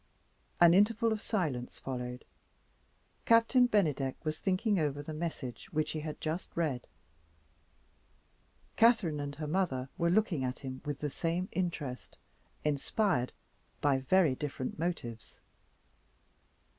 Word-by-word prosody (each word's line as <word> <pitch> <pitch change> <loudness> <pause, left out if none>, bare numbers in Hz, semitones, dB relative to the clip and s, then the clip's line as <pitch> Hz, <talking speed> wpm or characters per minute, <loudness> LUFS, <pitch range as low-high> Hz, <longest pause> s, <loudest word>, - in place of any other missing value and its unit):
An 170 -1 +8
interval 225 +4 +4
of 215 -1 -1
silence 155 - -2
followed. 125 -1 -5 1.0
Captain 230 +2 +5
Bennydeck 150 - +1
was 155 0 -2
thinking 195 +1 +1
over 145 -2 -1
the 155 - -6
message 150 -7 -5
which 155 0 0
he 155 - -3
had 155 0 -5
just 160 +3 -3
read. 145 -7 -1 1.9
Catherine 215 -10 +4
and 145 0 -4
her 155 +1 -5
mother 150 -6 0
were 170 0 +3
looking 180 -7 +2
at 125 0 -2
him 130 -1 -7
with 145 -1 -4
the 150 -2 -2
same 170 +5 -1
interest, 165 -8 -3 0.5
inspired 150 - +1 0.5
by 140 -2 +3
very 160 +2 +3
different 135 0 -4
motives. 140 -10 -4
155 Hz, 120 wpm, -32 LUFS, 135-185 Hz, 1.9 s, An